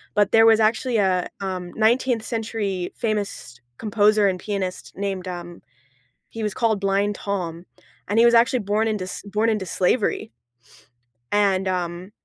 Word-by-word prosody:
but 205 -1 +3
there 225 0 +6
was 225 -1 +6
actually 230 +3 +1
a, 190 -4 +2
um, 185 -2 -4
19th 235 +1 +2
century 215 -6 -3
famous 205 - -3 0.2
composer 210 -1 +3
and 185 -1 -3
pianist 190 -2 -4
named, 195 -2 -3
um 175 -1 -7 0.7
he 225 - -6
was 210 -1 -1
called 220 -3 0
Blind 200 +1 +1
Tom. 180 -5 -4 0.4
And 205 +3 +1
he 230 - +6
was 235 - +5
actually 235 +2 +4
born 210 +1 0
into 210 -4 -2
s 185 - -6
born 210 +3 0
into 210 -4 -1
slavery, 190 - 0 1.0
and, 195 -2 +2
um, 180 +1 -3
205 Hz, 150 wpm, -23 LUFS, 185-220 Hz, 1.0 s, there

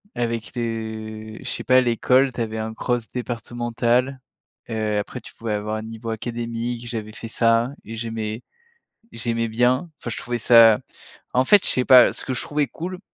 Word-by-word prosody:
avec 115 -1 -3
les 110 -2 -5
je - - -3
sais - - -2
pas, 130 0 +5
l'école, 125 +2 +3
tu 120 - -4
avais 110 -1 -3
un 110 0 -3
cross 120 0 -2
départemental. 120 +2 -1 0.5
Heu, 110 -2 -1
après, 105 +5 -4
tu - - -13
pouvais 115 -2 -3
avoir 105 +1 -2
un 110 - -4
niveau 115 +1 -7
académique. 120 +1 -4
J'avais 110 -3 -5
fait 115 - -8
ça 115 +1 +2
et 115 +2 -8
j'aimais 110 -1 -4 0.7
j'aimais 115 0 -1
bien. 125 +8 +1
Enfin, 120 - -6
je - - -4
trouvais 120 0 -3
ça 115 -2 +7 0.5
en 130 +1 +3
fait, 205 +3 +6
je - - +4
sais 125 - +1
pas. 125 -2 +8
Ce - - -6
que 130 - -2
je - - -2
trouvais 145 -2 -1
cool, 180 +8 -6
115 Hz, 185 wpm, -23 LUFS, 110-125 Hz, 0.7 s, pas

